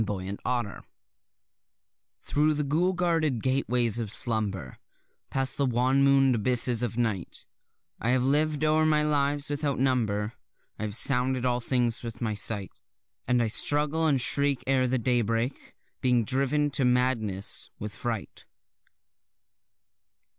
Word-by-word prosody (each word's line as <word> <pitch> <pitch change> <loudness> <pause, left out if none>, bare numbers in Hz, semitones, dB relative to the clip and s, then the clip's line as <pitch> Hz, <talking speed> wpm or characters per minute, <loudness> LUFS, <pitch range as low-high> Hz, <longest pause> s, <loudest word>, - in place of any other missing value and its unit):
Lovecraft 100 +3 -4 1.3
Thro' 150 +1 +1
the 150 0 -2
ghoul 165 +6 0
guarded 165 - 0
gateways 125 -3 +1
of 110 -4 -4
slumber, 105 - -2 0.5
Past 135 0 -1
the 140 - +1
wan 130 +3 +1
moon'd 135 -1 +4
abysses 120 +1 +3
of 120 -2 -3
night, 110 -7 -3 0.5
I 115 - -2
have 125 0 +2
liv'd 150 +2 +1
o'er 155 +1 +3
my 155 -1 +2
lives 145 -1 0
without 145 -1 -2
number, 115 -5 0 0.5
I - - -4
have 105 -1 -6
sounded 130 0 +1
all 125 -1 +1
things 120 -1 0
with 115 -2 -8
my 110 -3 -2
sight; 105 -1 0 0.6
And 125 0 +2
I - - 0
struggle 150 +7 +3
and 140 -4 +2
shriek 140 +1 +2
ere 130 -1 +2
the 130 +1 0
daybreak, 120 0 -2 0.3
being 125 -3 +2
driven 140 +4 +1
to 140 - 0
madness 125 -6 0
with 105 0 -6
fright. 115 -4 -6
125 Hz, 130 wpm, -27 LUFS, 115-140 Hz, 1.3 s, moon'd